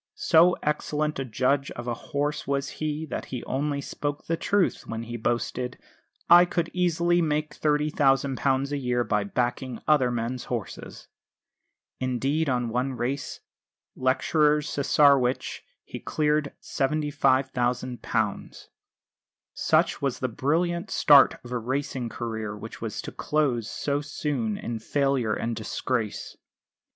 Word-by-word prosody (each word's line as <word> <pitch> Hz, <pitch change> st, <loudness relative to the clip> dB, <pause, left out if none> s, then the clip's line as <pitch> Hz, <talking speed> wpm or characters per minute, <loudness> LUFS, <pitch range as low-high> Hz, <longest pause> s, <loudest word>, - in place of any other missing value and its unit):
So 175 Hz, +2 st, +5 dB
excellent 150 Hz, 0 st, -1 dB
a 135 Hz, -, -2 dB
judge 130 Hz, +4 st, +1 dB
of 120 Hz, -, -7 dB
a 120 Hz, -, 0 dB
horse 145 Hz, +4 st, -3 dB
was 140 Hz, -1 st, -1 dB
he 155 Hz, 0 st, -3 dB
that -, -, -3 dB
he 125 Hz, -2 st, -6 dB
only 140 Hz, +1 st, -1 dB
spoke 145 Hz, +1 st, -4 dB
the 165 Hz, -, 0 dB
truth 200 Hz, +2 st, 0 dB
when 115 Hz, 0 st, -4 dB
he 120 Hz, +1 st, -6 dB
boasted, 120 Hz, +2 st, -2 dB, 0.5 s
"I 175 Hz, +1 st, +9 dB
could 170 Hz, -1 st, -2 dB
easily 175 Hz, -1 st, +2 dB
make 155 Hz, -1 st, -1 dB
£30,000 140 Hz, -2 st, +2 dB
a 145 Hz, -, 0 dB
year 125 Hz, -2 st, 0 dB
by 105 Hz, -3 st, 0 dB
backing 120 Hz, +2 st, -2 dB
other 145 Hz, -5 st, +4 dB
men's 120 Hz, +1 st, -3 dB
horses." 115 Hz, -6 st, -6 dB, 0.9 s
Indeed 135 Hz, +5 st, 0 dB
on 125 Hz, -2 st, 0 dB
one 125 Hz, +3 st, -1 dB
race, 130 Hz, +3 st, -3 dB, 0.5 s
Lecturer's 150 Hz, +3 st, +2 dB
Cesarewitch, 140 Hz, -3 st, +2 dB, 0.2 s
he -, -, -7 dB
cleared 150 Hz, -1 st, 0 dB
£75,000. 130 Hz, -4 st, -1 dB, 0.8 s
Such -, -, +2 dB
was 140 Hz, -3 st, 0 dB
the 130 Hz, -, -1 dB
brilliant 170 Hz, +8 st, 0 dB
start 145 Hz, -2 st, +6 dB
of 120 Hz, -, -10 dB
a 125 Hz, -, -1 dB
racing 130 Hz, 0 st, -3 dB
career 110 Hz, -3 st, -4 dB
which -, -, -9 dB
was -, -, -4 dB
to -, -, -6 dB
close 130 Hz, -7 st, 0 dB
so 145 Hz, 0 st, -1 dB
soon 140 Hz, -7 st, -2 dB
in 115 Hz, -1 st, -4 dB
failure 130 Hz, -2 st, 0 dB
and 115 Hz, 0 st, -2 dB
disgrace. 110 Hz, 0 st, -3 dB
135 Hz, 130 wpm, -26 LUFS, 120-150 Hz, 0.9 s, I